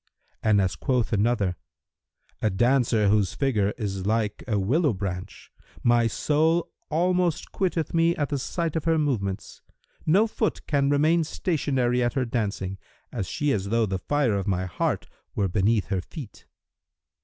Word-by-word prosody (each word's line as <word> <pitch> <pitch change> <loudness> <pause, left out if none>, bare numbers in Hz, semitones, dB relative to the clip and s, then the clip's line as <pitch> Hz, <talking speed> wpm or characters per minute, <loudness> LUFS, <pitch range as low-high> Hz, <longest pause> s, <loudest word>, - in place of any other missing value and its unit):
And 105 -2 +3
as 95 -2 +1
quoth 125 -4 0
another,[FN#328] 105 -1 -3
"A - - +3
dancer 120 0 +2
whose 100 -3 +2
figure 110 -8 +1
is 100 -4 -3
like 110 -1 0
a 110 -4 +1
willow 135 - +2
branch: 95 -1 -6 0.3
my 120 -1 +4
soul 160 +8 +1 0.2
almost 175 +1 +1
quitteth 170 -5 -1
me 165 +1 +3
at 145 -2 -1
the 145 - -1
sight 165 +4 -2
of 160 - -2
her 165 -1 +3
movements. 110 -11 -2 0.5
No 195 +8 +5
foot 220 -1 -2
can 140 -2 +1
remain 155 +4 +3
stationary 135 -7 0
at 120 0 +1
her 130 -3 0
dancing, 100 -5 -2 0.4
she 145 +10 -1
is 100 -5 -1
as - - -5
though 115 +1 +2
the 95 -2 -2
fire 145 0 +1
of 100 0 -2
my 95 -1 0
heart 90 - -1 0.3
were 100 - +1
beneath 100 +3 +1
her 95 -3 0
feet." 130 - -10
120 Hz, 155 wpm, -25 LUFS, 100-150 Hz, 0.5 s, No